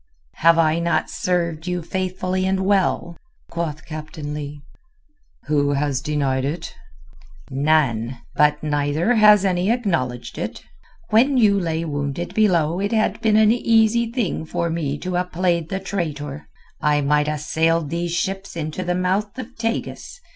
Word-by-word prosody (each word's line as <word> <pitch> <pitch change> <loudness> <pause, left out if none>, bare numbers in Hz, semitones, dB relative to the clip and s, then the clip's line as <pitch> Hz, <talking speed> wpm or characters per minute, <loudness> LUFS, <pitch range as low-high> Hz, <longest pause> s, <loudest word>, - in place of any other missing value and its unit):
"Have 165 +1 +5
I 160 0 +3
not 170 0 0
served 170 -2 -1
you 180 -1 -2
faithfully 185 +1 -2
and 190 0 +1
well?" 190 -3 +1 0.4
quoth 160 -3 -4
Captain 155 -1 -6
Leigh. 145 -1 -6 0.8
"Who 145 -1 +1
has 140 -2 0
denied 140 -3 0
it?" 160 +5 -4 0.8
"None. 135 -4 +1 0.2
But 150 0 +2
neither 150 +7 +1
has 210 -3 +6
any 185 +1 +1
acknowledged 170 - -1
it. - - -5 0.5
When 260 +5 +4
you 205 -4 +4
lay 165 -2 -2
wounded 145 +2 -3
below 175 -6 +2
it 200 +3 -1
had 220 -1 +1
been 215 -1 +3
an 215 0 +5
easy 230 0 +3
thing 230 -10 -1
for 170 +1 -2
me 150 -4 -2
to 180 +4 -4
ha' 180 0 -1
played 170 -2 0
the 190 - -2
traitor. 155 -7 -4 0.3
I 150 -1 +2
might 150 +1 +2
ha' 150 0 -1
sailed 160 +1 0
these 170 0 -2
ships 190 +3 -3
into 155 +2 -4
the 180 0 -1
mouth 195 +4 -1
of 255 0 -8
Tagus. 230 - -4
170 Hz, 150 wpm, -22 LUFS, 150-195 Hz, 0.8 s, has